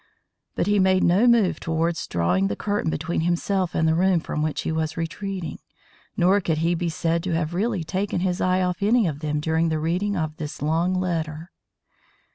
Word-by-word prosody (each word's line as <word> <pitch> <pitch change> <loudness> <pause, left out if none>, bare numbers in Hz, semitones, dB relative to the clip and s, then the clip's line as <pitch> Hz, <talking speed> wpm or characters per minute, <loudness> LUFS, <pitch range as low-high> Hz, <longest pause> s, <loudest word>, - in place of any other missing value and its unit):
But - - 0
he 205 +1 +2
made 185 0 +3
no 195 +8 +4
move 230 -6 +3
towards 165 +1 -1
drawing 90 +3 +1
the 100 - -2
curtain 205 - -1
between 160 +2 -2
himself 175 +2 0
and 160 - +2
the 160 - +3
room 180 +1 +3
from 150 - -4
which 155 0 -1
he - - -2
was 160 0 -2
retreating, 185 +2 -4 0.6
nor 190 +3 +4
could 160 -3 0
he 165 +2 +1
be 175 0 -1
said 165 +1 0
to 175 -1 -2
have 165 0 -1
really 200 -1 -1
taken 185 +2 -2
his 180 -1 -1
eye 185 0 +2
off 180 +1 -2
any 220 +2 +3
of 150 -4 -2
them 150 -1 -2
during 160 +2 +1
the 160 - 0
reading 180 +6 -1
of 155 -1 -3
this 150 -2 -6
long 165 +5 +1
letter. 165 -2 -3
170 Hz, 200 wpm, -24 LUFS, 160-185 Hz, 0.6 s, no